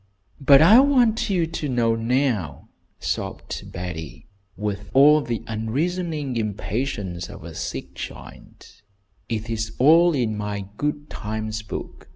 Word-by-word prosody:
"But 140 +1 +7
I 215 +9 +8
want 250 -6 +3
you 180 -4 +2
to 160 -2 -4
know 120 -2 +2
now!" 115 - -1 0.3
sobbed - - -4
Betty, 85 -4 -7 0.3
with 105 -1 -4
all 150 +3 +7
the 120 -4 -3
unreasoning 145 +5 -2
impatience 105 -4 -3
of - - -10
a 85 0 -8
sick - - -5
child. - - -11 0.5
"It 110 -1 -3
is 110 -1 -3
all 165 +5 +6
in 115 -5 0
my 105 -1 -4
'Good 145 0 -3
times 110 +1 -4
book.' 105 - -8
115 Hz, 130 wpm, -23 LUFS, 105-150 Hz, 0.5 s, I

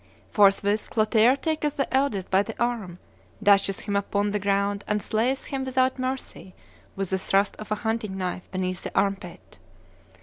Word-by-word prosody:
Forthwith 205 +1 +3
Clotaire 220 +3 +4
taketh 310 -2 -1
the 275 - -1
eldest 245 -9 0
by 190 +1 +5
the 225 +2 -7
arm, 230 -7 -2 0.5
dasheth 200 -1 +3
him 205 -1 -3
upon 200 0 0
the 210 - 0
ground, 200 0 0
and 210 0 +1
slayeth 235 +6 -1
him 270 -1 -3
without 260 0 +1
mercy 255 -7 -5 0.4
with 195 -1 -3
the 190 - +1
thrust 195 +2 +1
of 215 0 -9
a - - +3
hunting 220 -3 -1
knife 185 -1 -4
beneath 185 -1 -3
the - - -6
arm 195 0 +2
pit. 195 - -13
205 Hz, 170 wpm, -25 LUFS, 195-240 Hz, 0.5 s, by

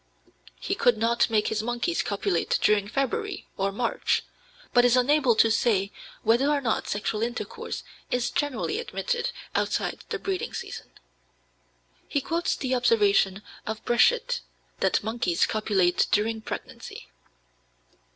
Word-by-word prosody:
He - - -2
could 240 -2 +3
not 230 +2 +2
make 215 -2 +2
his 215 -1 -1
monkeys 240 +9 -1
copulate 400 - 0
during 205 -1 +3
February 390 - -2
or 195 +1 0
March, 235 +4 0 0.5
but 245 -2 +6
is 245 0 +5
unable 260 -1 +4
to 225 0 +5
say 200 -4 +2 0.3
whether 240 +5 +3
or 295 -1 +2
not 235 -5 -1
sexual 210 +1 -2
intercourse 240 +1 -4 0.3
is 245 -1 0
generally 290 - -1
admitted 475 0 -2 0.2
outside - - -1
the - - -1
breeding 385 -2 -3
season. - - -6 1.2
He 285 - 0
quotes 335 +5 -1
the 260 -1 -2
observation 210 -5 +3 0.2
of 220 0 -4
Breschet 480 - +3 0.4
that - - +2
monkeys 220 -6 +1
copulate 200 -5 +2
during 220 +1 +1
pregnancy. - - -7
235 Hz, 130 wpm, -26 LUFS, 215-285 Hz, 1.2 s, but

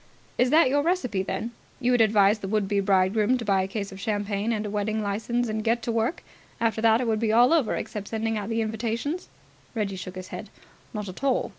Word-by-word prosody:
"Is 250 - +4
that 315 +2 +6
your 285 +3 +2
recipe, 290 - 0
then? 225 +4 -3 0.3
You 250 -1 +1
would 245 -2 +4
advise 210 -1 +4
the 195 - -5
would 210 0 0
be 200 0 +1
bridegroom 200 +4 +3
to 235 - -5
buy 195 -2 +3
a 190 - -2
case 200 0 -4
of 190 - -9
champagne 205 +1 -1
and 215 -2 -1
a - - -3
wedding 210 +1 -1
licence 225 +4 -1
and 215 0 -2
get 230 +1 +1
to 235 - -1
work? 230 +9 -1 0.4
After 225 -1 0
that 225 +1 +4
it - - -1
would 220 -1 +1
be 225 -1 +1
all 245 +6 +5
over 305 -9 +2
except 205 -2 -5
sending 225 0 -1
out 210 0 -3
the 225 0 0
invitations?" 230 - -3 0.5
Reggie 205 -3 -1
shook 185 0 -7
his 185 0 -7
head. - - -7 0.4
"Not 210 -2 -5
at 185 +8 -9
all. 270 -2 +1
220 Hz, 235 wpm, -26 LUFS, 205-235 Hz, 0.5 s, that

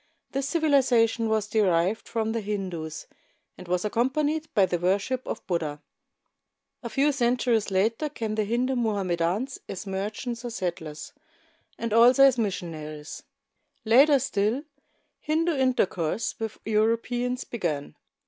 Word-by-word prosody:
This 275 +1 -2
civilization 255 -8 +3
was 215 -1 +1
derived 195 -2 +1
from 225 -1 -1
the 230 0 -2
Hindus, 185 -7 -4 0.5
and 180 - -12
was 180 +2 0
accompanied 290 +8 0
by 200 -3 +5
the 175 -1 -2
worship 200 +8 0
of - - -5
Buddha. 160 -5 -2 1.0
A 235 - -5
few 280 +5 +2
centuries 245 -4 +1
later, 225 +9 +1
came 225 -7 -4
the 215 0 0
Hindu 245 +5 0
Mohamme 205 -7 0
dans 195 +11 -1
as 195 +1 -6
merchants 210 +5 -4
or 240 - -4
settlers, 175 -8 -5 0.6
and 230 -2 -3
also 245 +4 +7
as 265 -3 +5
missionaries. 160 -7 -4 0.6
Later 275 +6 +6
still, 220 +2 0 0.6
Hindu 325 +2 0
intercourse 225 - 0
with 225 -1 -4
Europeans 230 +3 0
began. 160 -11 -3
220 Hz, 130 wpm, -26 LUFS, 190-250 Hz, 1.0 s, also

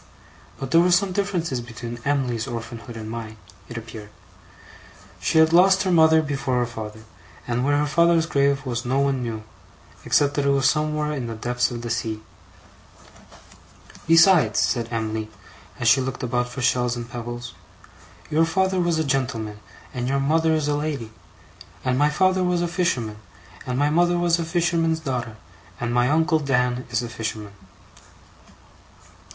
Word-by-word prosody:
But 135 -1 -5
there 165 - +6
were 180 - +3
some 185 +2 +3
differences 180 -9 -1
between 120 0 -8
Em'ly's 130 -4 -1
orphanhood 115 -1 -7
and 110 -1 -7
mine, 110 -1 -7 0.3
it 120 - -7
appeared. 110 -2 -9 1.1
She - - 0
had 160 0 +5
lost 190 +2 +5
her 185 - 0
mother 160 -1 +5
before 135 -3 -2
her 120 - +2
father; 110 -2 -8 0.5
and 120 +1 -1
where 145 +1 +2
her 150 - +1
father's 170 +2 +3
grave 140 -2 +1
was 120 -1 -3
no 130 +2 0
one 140 -2 +1
knew, 115 -3 -4 0.6
except 145 -1 +2
that 145 -1 -1
it - - +4
was 140 0 +3
somewhere 150 +1 0
in 135 -5 -3
the 115 - -5
depths 120 +2 -1
of 120 -1 -6
the 120 - -4
sea. 110 -2 -3 1.8
'Besides,' 165 - +5
said 115 +5 0
Em'ly, 110 -1 -3 0.5
as 120 - 0
she 130 +3 +5
looked 130 -1 -4
about 125 0 -1
for 125 +1 -5
shells 125 -1 +1
and 120 -1 -6
pebbles, 120 0 -7 0.8
'your 160 +2 +3
father 190 +2 +1
was 175 -2 +1
a 160 - +1
gentleman 125 -7 -2 0.3
and 125 -1 -3
your 140 +1 +1
mother 160 +3 +2
is 155 -2 -1
a 150 - +1
lady; 145 -7 -3 0.7
and 130 -1 +1
my 145 +3 +3
father 185 +4 +2
was 180 -1 +1
a - - 0
fisherman 150 - -1 0.5
and 125 0 -2
my 145 +2 +2
mother 175 +2 +3
was 175 -1 +2
a 165 - -2
fisherman's 165 -1 +1
daughter, 125 -7 -4 0.4
and 120 0 -2
my 125 +1 +3
uncle 160 +2 +2
Dan 125 -3 0
is 120 0 -1
a - - -4
fisherman. 110 -2 -5
135 Hz, 170 wpm, -23 LUFS, 120-160 Hz, 1.8 s, there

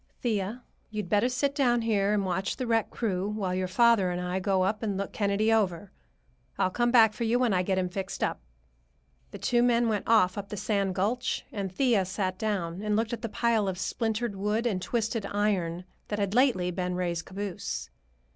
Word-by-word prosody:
"Thea, 220 +1 -1 0.3
you'd 210 -4 -4
better 210 +6 +3
sit 275 +3 0
down 245 -5 +2
here 205 -3 +2
and 205 -2 +1
watch 190 +1 -2
the 255 - -2
wreck 225 -2 +1
crew 195 -4 -2
while 200 -4 -2
your 185 0 -1
father 230 -2 +4
and 180 0 -2
I 180 +1 -2
go 190 -1 +1
up 205 +3 0
and 205 -4 -2
look 200 0 -4
Kennedy 210 +2 +1
over. 195 -3 0 0.7
I'll 185 - +1
come 240 +4 +1
back 225 -3 +6
for 235 - -4
you 230 +2 +2
when 245 -4 +2
I 180 - +3
get 190 +1 0
him 185 -1 +1
fixed 190 +1 -4
up." - - -1 0.9
The - - -8
two 240 -1 +2
men 240 -1 +3
went 210 -2 -1
off 205 -4 +4
up 200 - -7
the 210 - -5
sand 200 -2 0
gulch, 230 +7 -1
and 195 -3 -4
Thea 225 -2 +2
sat 185 0 -3
down 190 -5 -2
and 210 0 0
looked 225 +2 0
at 235 - -4
the 230 - -3
pile 225 -2 +1
of 185 -1 -2
splintered 225 +2 -2
wood 210 +4 -1
and 200 -6 0
twisted 220 -1 -1
iron 185 -4 -1 0.2
that 210 - -3
had 200 -1 -1
lately 225 -8 +3
been 180 0 -2
Ray's 175 -2 -1
caboose. 195 +1 -5
205 Hz, 205 wpm, -28 LUFS, 185-230 Hz, 0.9 s, back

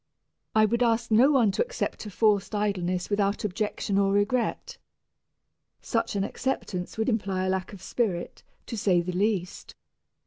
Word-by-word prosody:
I 215 0 +6
would 235 +3 0
ask 230 -1 +1
no 240 +6 +6
one 240 -8 +4
to - - -1
accept - - -4
a - - -5
forced 210 +1 +1
idleness 185 -3 -1
without 200 0 +1
objection 205 0 -1
or 195 0 +2
regret. 205 +5 0 1.0
Such 230 -3 -1
an 195 - +1
acceptance 200 -6 -3
would 220 - 0
imply 195 -5 0
a - - 0
lack 190 -1 -2
of 195 -3 -11
spirit, 195 -8 -2 0.2
to 235 - -5
say 190 -5 +2
the 180 +1 -4
least. 190 -1 -2
205 Hz, 160 wpm, -27 LUFS, 190-225 Hz, 1.0 s, I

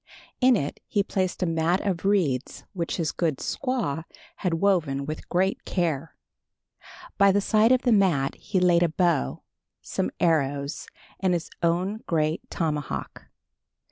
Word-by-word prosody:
In 255 -1 +5
it 145 -8 -3
he 205 - +1
placed 185 -2 -1
a - - +2
mat 165 +2 +1
of 190 -3 -1
reeds 160 -10 0
which 170 -3 -3
his 165 -4 0
good 160 -6 -1
squaw 235 - -2 0.3
had 180 -4 0
woven 165 -7 +1
with 155 +1 -6
great 190 +2 +1
care. 165 -4 -2 1.0
By 200 0 +7
the 200 - +3
side 215 +3 +3
of 255 0 +3
the 245 - +3
mat 180 -10 +3
he 190 - -2
laid 175 -1 +4
a 175 - +3
bow, 160 - 0 0.4
some - - -2
arrows 145 -3 0 0.3
and 185 -2 +2
his 165 - -4
own 180 +5 0
great 155 -1 0
tomahawk. 150 -4 -3
175 Hz, 145 wpm, -26 LUFS, 155-195 Hz, 1.0 s, By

